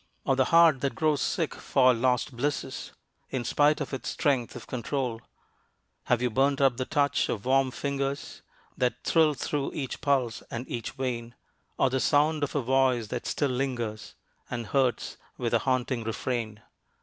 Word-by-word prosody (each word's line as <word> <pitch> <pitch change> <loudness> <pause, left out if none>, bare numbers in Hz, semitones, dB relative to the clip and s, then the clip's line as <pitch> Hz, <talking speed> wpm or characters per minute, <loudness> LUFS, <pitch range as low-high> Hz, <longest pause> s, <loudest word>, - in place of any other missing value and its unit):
Or 135 - +3
the 130 0 +3
heart 165 -4 +5
that 140 - -1
grows 155 -3 +1
sick 165 -3 -1
for 130 -2 +3
lost 125 +1 0
blisses 140 +3 -3 0.4
In 130 -2 -2
spite 145 +4 +3
of 145 -1 -4
its 135 - -3
strength 130 -5 0
of - - -8
control? 125 -1 -3 0.8
Have 125 0 +1
you 125 - +1
burned 135 +4 +2
up 135 -4 +3
the 130 - -2
touch 140 0 +1
of 105 0 -3
warm 135 0 +3
fingers 140 +1 -3 0.3
That 125 -1 -1
thrilled 155 -3 +3
through 145 -2 -2
each 135 -3 -4
pulse 130 -5 +1
and 120 +3 -5
each 120 - -4
vein, 120 -3 -4 0.4
Or 135 - +2
the 130 - +1
sound 150 +3 +2
of 145 - -2
a 140 - +1
voice 130 -3 +2
that 125 -1 -4
still 145 -3 0
lingers 120 -4 -3 0.3
And 120 -2 -4
hurts 130 +2 0 0.2
with - - -2
a - - +4
haunting 130 -2 0
refrain? 110 -1 -3
130 Hz, 170 wpm, -28 LUFS, 120-140 Hz, 0.8 s, heart